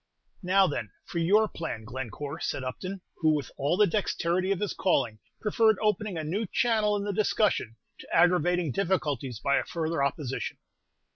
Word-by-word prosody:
"Now, 190 +1 +4
then, 120 - -2 0.2
for 170 - -3
your 205 +6 +4
plan, 160 - -5
Glencore," 130 +6 -6
said 135 - -2
Upton, 185 +9 -5 0.2
who, 155 -2 +3
with 145 - -4
all 145 +5 0
the 210 - +6
dexterity 185 -1 0
of 195 - 0
his 210 - -1
calling, 125 - +1 0.2
preferred 220 0 +3
opening 210 -3 0
a 160 - -2
new 195 +8 -2
channel 220 -1 +2
in 200 - -2
the 205 0 -2
discussion, 200 - +1 0.2
to - - -11
aggravating 175 -2 +3
difficulties 145 - -1
by 140 +3 +2
a - - +1
further 160 -3 -2
opposition. 140 -1 -2
175 Hz, 165 wpm, -28 LUFS, 140-200 Hz, 0.2 s, the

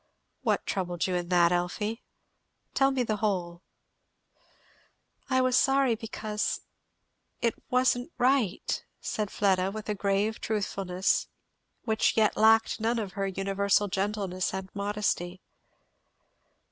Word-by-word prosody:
"What - - 0
troubled 175 -3 -1
you 185 - -1
in 175 -1 -2
that, 175 -1 +4
Elfie? 210 +6 -1 0.7
tell 270 0 +4
me 265 -2 0
the 215 -2 -1
whole." 180 -5 -2 1.7
"I 260 -1 +3
was 255 -1 +2
sorry, 270 -2 +4
because, 215 -1 -3 0.8
it 235 - +1 0.2
wasn't 250 +3 +2
right," 250 -6 +1 0.2
said 210 -2 -3
Fleda, 190 -2 +2
with 215 +1 -7
a - - +2
grave 200 +2 0
truthfulness 195 -3 0 0.6
which 220 -1 +1
yet 215 -1 +3
lacked 225 +1 +4
none 230 +2 +1
of 210 -4 -3
her 195 -1 -1
universal 195 +1 +1
gentleness 195 -1 -2
and 190 0 -5
modesty. 200 -3 -2
205 Hz, 120 wpm, -28 LUFS, 190-225 Hz, 1.7 s, that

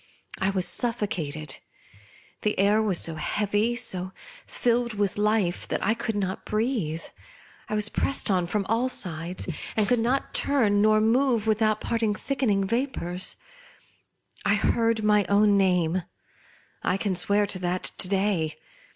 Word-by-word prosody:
I 190 - +1
was 190 -2 0
suffocated. 165 - -1 0.8
The 210 - -1
air 205 +3 +3
was 205 -5 +1
so 165 - 0
heavy, 205 +8 0
so 190 -6 +1 0.3
fil 240 0 +1
led 235 -2 -5
with 200 -2 0
life, 210 -4 0
that - - -2
I 220 - +3
could 225 -1 -3
not 190 -2 -3
breathe. 215 - -2 0.7
I 215 - -1
was 210 0 +3
pressed 265 -3 0
on 180 -2 +1
from 200 +2 -1
all 230 +4 +1
sides, 175 -4 -2 0.3
and 210 -2 +2
could 245 +2 +2
not 250 +4 -1
turn 215 -8 +2
nor 215 0 +4
move 235 0 +2
without 215 -1 +1
parting 225 -3 0
thickening 245 -6 0
vapours. 190 -6 -1 1.1
I 200 0 +3
heard 225 +1 +1
my 210 -1 +4
own 205 0 +4
name, 180 -2 +2 0.8
I 180 - 0
can 195 -2 -1
swear 200 +3 +2
to 190 -1 -1
that 180 0 -2 0.2
to - - +3
day 190 -5 0
210 Hz, 150 wpm, -26 LUFS, 185-225 Hz, 1.1 s, nor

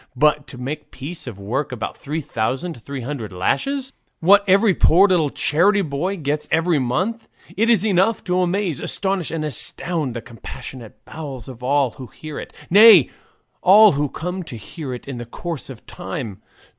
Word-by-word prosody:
But 150 +2 +2
to 125 - -10
make 135 +5 -4
a - - -33
piece 145 +3 -8
of 115 -6 -7
work 120 +9 -3
about 115 -5 -4
three 155 +3 -4
thousand 135 +2 -3
three 140 +2 -6
hundred 120 -4 -5
lashes, 265 - -1 0.3
what 200 +4 +6
every 195 +2 +5
poor 185 +3 +5
little 170 -6 +2
charity 195 +9 +2
boy 170 +6 -2
gets 150 -1 -2
every 165 -1 +2
month 185 - -2 0.3
it 225 +3 +2
is 220 -4 +4
enough 200 +2 +2
to 180 0 0
amaze, 180 -4 0
astonish, 195 -4 -1
astound 155 -1 -2
the - - -2
compassionate 115 +1 -10
bowels 140 -7 -8
of 125 -2 -10
all 135 0 +2
who 130 +3 -10
hear 155 +6 -8
it, - - -9 0.2
nay, 205 - +8 0.5
all 210 +3 +8
who 145 0 -1
come 180 +6 -4
to 165 -8 -8
hear 130 - -7
it 125 +1 -7
in 135 -3 -5
the 120 - -6
course 165 +4 -6
of 130 -4 -11
time. 135 - -6
150 Hz, 175 wpm, -21 LUFS, 130-185 Hz, 0.5 s, nay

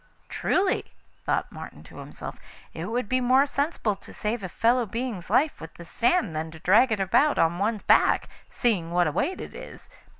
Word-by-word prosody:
'Truly,' 375 0 0 0.3
thought - - 0
Martin - - -10
to - - -14
himself, - - -8 0.3
'it 165 - -5
would 230 +2 -2
be 255 +2 +1
more 260 +3 +4
sensible 280 -7 -1
to 195 - -13
save 215 +2 -3
a 185 - -5
fellow 240 +6 +2
being's 225 -4 -4
life 275 +8 +2
with 160 - -10
this 170 -1 -12
sand 240 - +1
than 160 +1 -3
to 160 - -11
drag 215 +10 +4
it 215 - 0
about 275 +10 +3
on 165 +2 +2
one's 210 +1 -1
back, - - +4 0.2
seeing 195 -9 0
what 175 +1 +2
a 150 - 0
weight 365 - -1
it - - -8
is. - - -11
220 Hz, 195 wpm, -26 LUFS, 175-255 Hz, 0.3 s, more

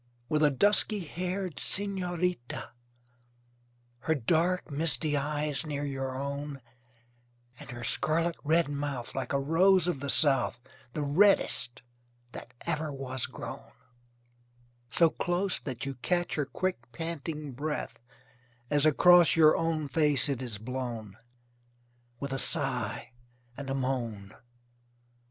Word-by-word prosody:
With 155 0 +1
a 150 - +5
dusky 205 - +3
haired 180 -1 -4
senorita, 180 -7 -1 1.3
Her 160 +6 0
dark, 165 +7 0
misty 150 0 +2
eyes 145 0 0
near 145 -2 -4
your 135 -2 -4
own, 140 0 -5 1.0
And - - -11
her 120 -1 -7
scarlet 165 +7 +1
red 160 +2 +3
mouth, 145 -4 -4
Like 135 - -4
a 140 - +1
rose 175 +5 +3
of 175 -6 -1
the 140 +1 -4
south, 135 -6 +4 0.3
The 150 - -2
reddest 145 -6 +3 0.5
that 120 - -9
ever 155 -2 -2
was 130 -2 -2
grown, - - -9 1.2
So 165 +6 +3
close 180 +2 -1
that 130 -2 -6
you 140 - -3
catch 175 +7 -1
Her 145 -3 -1
quick 135 -5 -3
panting 155 0 -5
breath 150 +4 -4 0.7
As 145 +1 +4
across 175 +2 +6
your 155 -1 +6
own 165 -2 -1
face 150 -1 +2
it 135 -3 -2
is 120 -5 -3
blown, 115 -3 -6 1.0
With 140 -1 -4
a 135 - -1
sigh, 130 -11 -1 0.4
and 140 0 -7
a 135 - -1
moan. 120 -7 -3
145 Hz, 125 wpm, -29 LUFS, 135-165 Hz, 1.3 s, across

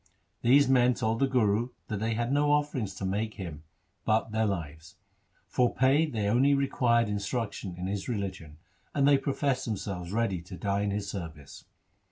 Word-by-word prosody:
These 135 +3 +5
men 125 -1 +4
told 115 -1 -1
the 135 - +3
Guru 120 -2 +2 0.2
that 105 -3 -3
they 110 +1 -1
had 120 +2 -1
no 145 +1 +3
offerings 145 -8 -1
to 95 - -4
make 105 +3 -2
him 85 -7 -7 0.4
but 110 0 +1
their 110 0 +1
lives; 80 -4 -5 0.5
for 125 -1 +1
pay 140 +5 +4
they 110 -8 -2
only 130 +6 +4
required 120 -4 +2
instruction 105 -2 -3
in 90 - -4
his 100 +4 -3
religion; 95 -9 -4 0.4
and 140 -1 +3
they 140 -1 +5
professed 135 -1 -1
themselves 95 -5 -4
ready 105 -5 0
to 90 +2 -10
die 100 0 -1
in 105 - 0
his 100 0 -2
service. 80 -8 -8
110 Hz, 175 wpm, -29 LUFS, 100-130 Hz, 0.5 s, These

